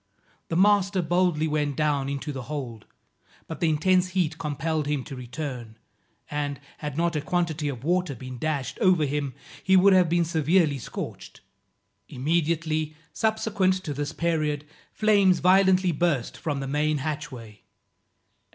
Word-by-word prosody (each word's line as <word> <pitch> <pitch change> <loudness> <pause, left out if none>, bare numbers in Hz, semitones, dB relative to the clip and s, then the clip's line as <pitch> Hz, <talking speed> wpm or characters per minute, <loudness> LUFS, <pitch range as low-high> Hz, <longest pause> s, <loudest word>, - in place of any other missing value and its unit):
The 165 - -3
master 195 0 +3
boldly 175 -2 +1
went 150 -2 -1
down 145 -2 0
into 140 +2 -4
the 135 -2 -5
hold, 125 -8 -6 0.6
but 160 - -7
the 165 - +2
intense 180 +4 +3
heat 175 -4 -1
compelled 150 0 -2
him 145 -3 -1
to 135 - -8
return, 125 -3 -6 0.5
and, 145 -2 -2 0.2
had 150 -2 -5
not 170 0 +1
a 150 - 0
quantity 160 -2 -1
of 125 -3 -6
water 180 -2 0
been 130 +1 -8
dashed 140 -4 -2
over 185 -7 +4
him, 140 -2 -2 0.3
he 190 0 +5
would 195 +1 +6
have 180 -3 +5
been 170 0 +2
severely 160 -2 +2
scorched. - - -7 0.7
Immediately 155 +1 -1 0.2
subsequent 220 -4 +1
to 150 - -3
this 145 +1 -3
period, 155 -2 -1 0.3
flames 200 -4 +4
violently 185 0 +4
burst 155 -6 0
from 145 -3 -3
the 135 - -4
main 150 +2 +1
hatchway. 130 -7 -6
155 Hz, 145 wpm, -26 LUFS, 145-175 Hz, 0.7 s, would